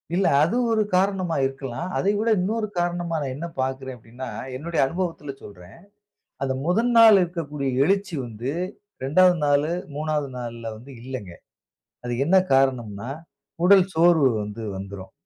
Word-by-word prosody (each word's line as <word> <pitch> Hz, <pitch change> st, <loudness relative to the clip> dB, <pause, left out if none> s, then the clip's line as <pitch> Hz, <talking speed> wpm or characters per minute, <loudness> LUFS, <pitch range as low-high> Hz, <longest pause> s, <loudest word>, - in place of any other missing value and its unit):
இல்ல 190 Hz, +1 st, +2 dB, 0.2 s
அது 170 Hz, +9 st, +1 dB, 0.2 s
ஒரு 220 Hz, -1 st, +3 dB
காரணமா 185 Hz, -3 st, +1 dB
இருக்கலாம். 135 Hz, +4 st, -4 dB
அதை 200 Hz, -, +2 dB
விட 225 Hz, +2 st, +1 dB
இன்னொரு 215 Hz, +4 st, -1 dB
காரணமா 175 Hz, -1 st, -1 dB
நான் 135 Hz, -2 st, -3 dB
என்ன 165 Hz, +5 st, -5 dB
பாக்கிறேன் 130 Hz, 0 st, -3 dB
அப்படின்னா, 120 Hz, +3 st, -9 dB, 0.3 s
என்னுடைய 165 Hz, +4 st, -3 dB
அனுபவத்தில 165 Hz, -1 st, -3 dB
சொல்றேன். 90 Hz, -1 st, -13 dB, 0.7 s
அந்த 135 Hz, -1 st, 0 dB
முதல் 225 Hz, +8 st, +2 dB
நாள் 225 Hz, -3 st, +9 dB
இருக்கக்கூடிய 150 Hz, -5 st, -3 dB, 0.2 s
எழுச்சி 195 Hz, +1 st, 0 dB
வந்து, 115 Hz, +3 st, -5 dB, 0.5 s
2வது 180 Hz, +6 st, +5 dB
நாளு, 145 Hz, +2 st, +2 dB, 0.2 s
3வது 150 Hz, -1 st, -1 dB
நாள்ல 115 Hz, -2 st, -6 dB
வந்து 125 Hz, +6 st, -13 dB
இல்லங்க. 125 Hz, -8 st, -7 dB, 0.7 s
அது 120 Hz, -, -2 dB
என்ன 175 Hz, +5 st, +3 dB, 0.2 s
காரணம்ன்னா, 120 Hz, -5 st, +1 dB, 0.6 s
உடல் 190 Hz, -1 st, +7 dB
சோர்வு 160 Hz, -4 st, +5 dB
வந்து 105 Hz, +2 st, -7 dB
வந்துரும். 95 Hz, 0 st, -8 dB
145 Hz, 140 wpm, -24 LUFS, 125-180 Hz, 0.7 s, நாள்